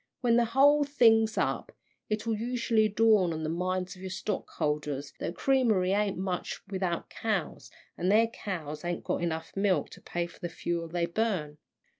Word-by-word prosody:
When 235 -3 +3
the 240 0 +4
whole 285 +5 +5
thing's 225 -6 +4
up, - - -1 0.4
it'll 215 +1 -1
usually 230 -1 +1
dawn 210 -4 +4
on 160 0 -4
the 155 - -1
minds 185 +1 -2
of 185 - -14
your 190 - -5
stockholders 150 -7 -3
that - - -2
a - - -4
creamery 220 -5 +2
ain't 200 -1 +1
much 185 -1 -3
without 185 -3 -2
cows, 215 -6 -3 0.3
and 180 +2 +2
their 220 +2 +6
cows 165 -9 -6
ain't 175 0 -3
got - - -1
enough 160 -1 -3
milk 195 -2 +1
to - - -12
pay 175 0 -2
for 170 - -14
the 175 - -4
fuel 170 0 -3
they 170 +1 -1
burn. 170 -6 -2
190 Hz, 175 wpm, -29 LUFS, 170-225 Hz, 0.4 s, their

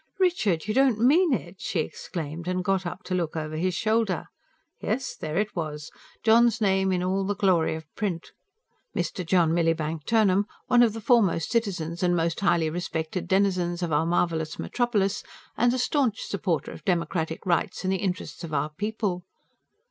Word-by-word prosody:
"Richard! 220 - +2
You 215 - 0
don't 265 -2 +4
mean 310 +9 +4
it!" 220 -6 -2
she 225 - -2
exclaimed, 160 +1 -6
and 185 0 -1
got 190 -1 0
up 185 +4 -7
to 185 - -4
look 170 -4 -1
over 155 -1 -3
his 180 +3 0
shoulder. 220 -3 +1 0.6
Yes, 260 +5 -2
there 155 +1 -4
it 210 +1 -1
was 150 -3 -4 0.3
John's 230 +1 +5
name 190 -2 +2
in 180 -1 0
all 190 +2 0
the 205 +1 -1
glory 185 -5 +2
of 160 0 -8
print. 185 -6 -3 0.6
"Mr. 185 - -2
John 170 -2 +3
Millibank 165 -2 0
Turnham, 205 -3 +3 0.2
one 245 -1 +4
of 230 -3 +4
the 225 - -6
foremost 200 - +3
citizens 180 -8 -1
and 175 -1 +3
most 165 0 0
highly 170 -4 +2
respected 165 0 -3
denizens 185 -3 +1
of 165 -3 -1
our 155 +2 +2
marvellous 165 -2 0
metropolis, 215 -6 0 0.3
and 240 +1 +3
a 255 - 0
staunch 250 -3 +1
supporter 185 -5 -2
of - - -11
democratic 170 -4 -1
rights 175 +1 0
and 190 0 +1
the - - +1
interests 185 -2 -4
of 155 -2 -4
our 150 +2 0
people." 205 0 -2
185 Hz, 175 wpm, -26 LUFS, 165-215 Hz, 0.6 s, John's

